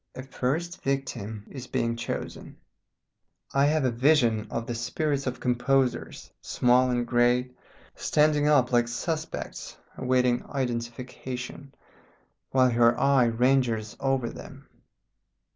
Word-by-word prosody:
A 130 - -6
first 155 +7 -3
victim 115 -6 -3
is 130 -2 -8
being 115 0 -1
chosen. 115 - -6 1.0
I 140 +1 +4
have 150 -1 +2
a 130 - +2
vision 120 -4 +2
of 115 - -3
the 120 - -4
spirits 135 +4 -2
of 125 0 -3
composers 125 +1 0
small 125 +1 +3
and 120 -1 0
great 125 +1 +2 0.4
standing 150 -1 +2
up 135 -5 +4
like 120 -1 +3
suspects 160 +6 -5 0.2
awaiting 125 -1 +1
identification, 125 +1 -5 0.7
while 130 -1 +3
her 120 0 +3
eye 140 -3 +4
ranges 115 -2 +1
over 135 -3 0
them. - - -12
125 Hz, 115 wpm, -27 LUFS, 120-135 Hz, 1.0 s, I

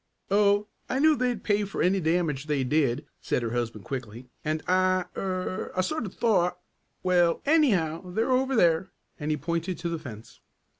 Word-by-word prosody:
"Oh, 205 0 +4 0.2
I 260 - 0
knew 310 +2 +5
they'd 250 -5 -1
pay 205 -1 +2
for 200 - -2
any 190 +2 +3
damage 160 -4 0
they 145 -3 +1
did," 135 -2 +1
said 125 - -1
her 115 - -2
husband 115 -3 -3
quickly, 125 -2 -6
"and 155 +1 -2
I 185 0 +3
er 185 -1 -3
I - - +4
sort 235 +4 -2
of 190 - -11
thought 180 -6 +2 0.5
well, 175 -2 +3
anyhow 195 - +2
they're 220 +8 0
over 260 +1 +2
there," 175 -3 +3 0.3
and 150 0 -3
he 155 - +1
pointed 170 +4 -2
to 170 - -3
the 165 -1 -3
fence. 115 -7 -11
180 Hz, 180 wpm, -27 LUFS, 150-200 Hz, 0.5 s, knew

